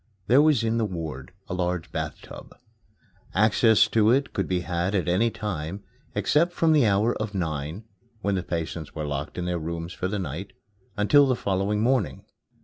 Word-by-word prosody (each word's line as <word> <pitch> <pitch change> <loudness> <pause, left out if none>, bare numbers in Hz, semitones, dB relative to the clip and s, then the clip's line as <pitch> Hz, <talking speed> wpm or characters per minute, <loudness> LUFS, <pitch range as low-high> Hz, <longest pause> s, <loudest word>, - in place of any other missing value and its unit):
There 125 +8 +5
was 150 -6 +3
in 115 0 +1
the 110 - +1
ward 80 -8 -6 0.2
a - - -4
large 90 -2 -2
bath 80 -1 -4
tub. - - -12 0.8
Access 110 +1 +5
to 110 -1 +3
it 135 +4 +2
could 95 - -1
be 90 -1 0
had 90 +3 -1
at 95 - 0
any 95 +7 +3
time, 100 -3 -5 0.3
except 170 +4 +2
from 165 -2 +2
the 145 -7 +4
hour 105 +4 +2
of 105 -1 -4
nine 80 +2 -3 0.4
(when 100 0 0
the 95 - 0
patients 85 -3 -5
were 75 -2 -3
locked 70 +2 -4
in 90 - -2
their 90 -1 -1
rooms 85 +2 -5
for 90 - -3
the 105 +2 -2
night) 95 +2 -5 0.4
until 140 +8 +5
the 130 - +2
following 100 0 -1
morning. 125 -4 0
95 Hz, 185 wpm, -25 LUFS, 85-110 Hz, 0.8 s, There